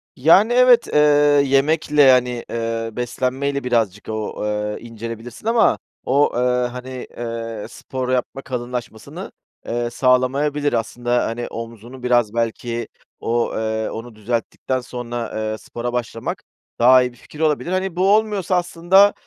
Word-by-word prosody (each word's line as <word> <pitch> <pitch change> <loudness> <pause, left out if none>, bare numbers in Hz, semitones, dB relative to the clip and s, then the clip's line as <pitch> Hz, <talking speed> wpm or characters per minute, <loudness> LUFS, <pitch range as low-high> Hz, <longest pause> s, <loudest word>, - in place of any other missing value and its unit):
Yani 185 - +5
evet, 245 -1 +6
eee, 150 - +5 0.5
yemekle, 150 +2 +2
yani, 125 -3 +4
eee, 115 0 -2
beslenmeyle 130 +4 -2
birazcık 115 -6 0
o, 110 -1 -4
eee, 105 0 -2
incelebilirsin 115 - -8
ama 230 0 +4 0.3
o, 140 +3 +3
eee, 120 - +1 0.3
hani, 125 +1 -7
eee, 115 -2 -5
spor 130 -1 -5
yapma 130 +1 -1
kalınlaşmasını, 125 -3 -6 0.3
eee, 120 0 -2
sağlamayabilir 135 +4 +1
aslında. 120 +2 0
Hani 120 +1 -3
omzunu 115 +2 -9
biraz 120 -3 +2
belki, 115 0 -2 0.3
o, 120 +1 0
eee, 110 0 -1
onu 115 0 -8
düzelttikten 115 +4 -2
sonra, 120 -1 -5
eee, 110 0 -2
spora 120 +2 -5
başlamak, 115 -2 -4 0.4
daha 130 +2 +7
iyi 125 0 -1
bir 120 - -20
fikir 150 - -14
olabilir. 160 +2 +1
Hani, 185 -1 -1
bu 190 +2 +2
olmuyorsa 210 -4 0
aslında, 180 +3 +4
125 Hz, 135 wpm, -21 LUFS, 115-140 Hz, 0.5 s, daha